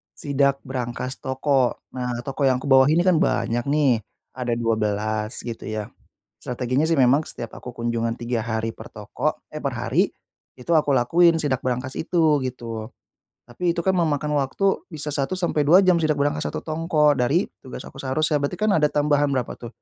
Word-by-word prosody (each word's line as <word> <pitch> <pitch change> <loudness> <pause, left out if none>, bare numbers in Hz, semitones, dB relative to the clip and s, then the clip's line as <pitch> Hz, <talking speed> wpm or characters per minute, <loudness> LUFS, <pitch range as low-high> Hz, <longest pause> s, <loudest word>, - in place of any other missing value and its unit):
sidak 140 -1 0
brankas 130 0 -4
toko. 130 -1 +1 0.2
Nah, 125 -1 -3
toko 135 0 0
yang 130 0 +1
aku - - -4
bawahi 135 +4 +6
ini 175 - +3
kan 185 -3 +4
banyak 120 -7 0
nih, 140 -5 +3 0.4
ada 125 -2 -2
12, 110 -1 -1
gitu 115 -2 -6
ya. 110 -1 -4 0.5
Strateginya 125 +3 -1
sih 165 - +2
memang 135 +5 +4
setiap 115 -5 -7
aku 125 - -8
kunjungan 115 -1 -1
3 120 -1 -2
hari 110 0 -2
per - - -11
toko - - -3
eh, - - -5
per - - 0
hari, - - +1 0.5
itu 125 - -5
aku 150 -2 +3
lakuin 165 +7 +4
sidak 135 -4 -1
brankas 130 +1 -2
itu, 160 -4 +2
gitu. 115 -3 -5 0.6
Tapi 170 +9 -1
itu - - 0
kan 190 - +3
memakan 150 -3 0
waktu 195 +9 0
bisa 150 -3 -3
1-2 170 +3 +3
jam 180 -2 +4
sidak 155 -2 +1
brankas 145 +2 0
1 - - -4
toko, 155 -2 +2
dari 140 +10 +2 0.2
tugas 130 - -8
aku 135 - -10
seharusnya. 150 +2 +1
Berarti 140 +5 -2
kan 215 0 +2
ada 150 -5 +3
tambahan 145 0 +2
berapa 125 -2 -2
tuh, 120 - -8
135 Hz, 175 wpm, -23 LUFS, 120-155 Hz, 0.6 s, bawahi